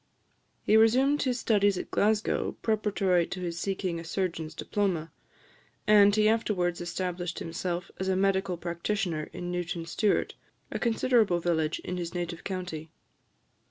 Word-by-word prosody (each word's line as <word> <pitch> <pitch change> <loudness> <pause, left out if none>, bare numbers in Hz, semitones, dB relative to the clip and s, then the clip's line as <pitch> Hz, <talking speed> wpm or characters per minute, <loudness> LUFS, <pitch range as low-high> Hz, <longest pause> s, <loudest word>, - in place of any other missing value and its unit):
He 215 - +3
resumed 260 +6 +4
his 250 -2 0
studies 205 -4 +3
at - - -6
Glasgow 215 +1 +1
preparatory 200 -5 +1
to 185 - -5
his 170 -1 -4
seeking 185 -3 -2
a - - -7
surgeon's 165 -2 -3
diploma; 180 -6 -1 0.7
and 205 -1 +6
he 215 0 +4
afterwards 195 -6 +1
established 175 0 -3
himself 175 +1 -4
as 190 - -2
a 190 - +2
medical 190 -1 +1
practitioner 170 -1 -2
in 175 0 -5
Newton 175 -1 -3
Stewart, 205 +4 +1 0.4
a - - -3
considerable 230 -5 +2
village 160 -2 0
in 180 - -4
his 175 0 -5
native 175 -1 -4
county. 180 -5 -5
185 Hz, 140 wpm, -28 LUFS, 175-210 Hz, 0.7 s, and